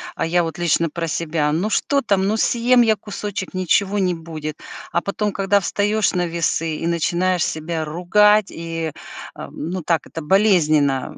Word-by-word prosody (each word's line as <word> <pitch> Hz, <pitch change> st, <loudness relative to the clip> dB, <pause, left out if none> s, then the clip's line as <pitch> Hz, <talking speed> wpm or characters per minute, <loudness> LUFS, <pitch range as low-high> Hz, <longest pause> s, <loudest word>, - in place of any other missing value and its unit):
а -, -, -1 dB
я 175 Hz, +2 st, +2 dB
вот 165 Hz, -2 st, -5 dB
лично 170 Hz, -1 st, +1 dB
про 165 Hz, +2 st, -4 dB
себя. 155 Hz, -2 st, -1 dB
Ну 175 Hz, +8 st, 0 dB
что 280 Hz, +6 st, +1 dB
там, 200 Hz, -5 st, +1 dB
ну 215 Hz, +2 st, 0 dB
съем 240 Hz, +2 st, +3 dB
я 225 Hz, -2 st, +4 dB
кусочек, 205 Hz, -2 st, -6 dB
ничего 190 Hz, +2 st, +1 dB
не 180 Hz, -2 st, +1 dB
будет, 155 Hz, -2 st, -7 dB, 0.3 s
а 170 Hz, -, +1 dB
потом, 205 Hz, +2 st, -2 dB
когда 195 Hz, +1 st, +2 dB
встаешь 205 Hz, +2 st, 0 dB
на 180 Hz, -1 st, 0 dB
весы 165 Hz, -1 st, -1 dB
и 165 Hz, -, -3 dB
начинаешь 175 Hz, +1 st, +1 dB
себя 160 Hz, 0 st, -3 dB
ругать, 205 Hz, +6 st, +3 dB
и, 165 Hz, -1 st, -5 dB, 0.4 s
а, -, -, -8 dB
ну 175 Hz, +3 st, -5 dB
так 165 Hz, 0 st, 0 dB
это 165 Hz, -, -7 dB
болезненно 155 Hz, -7 st, +2 dB
175 Hz, 170 wpm, -20 LUFS, 165-205 Hz, 0.4 s, я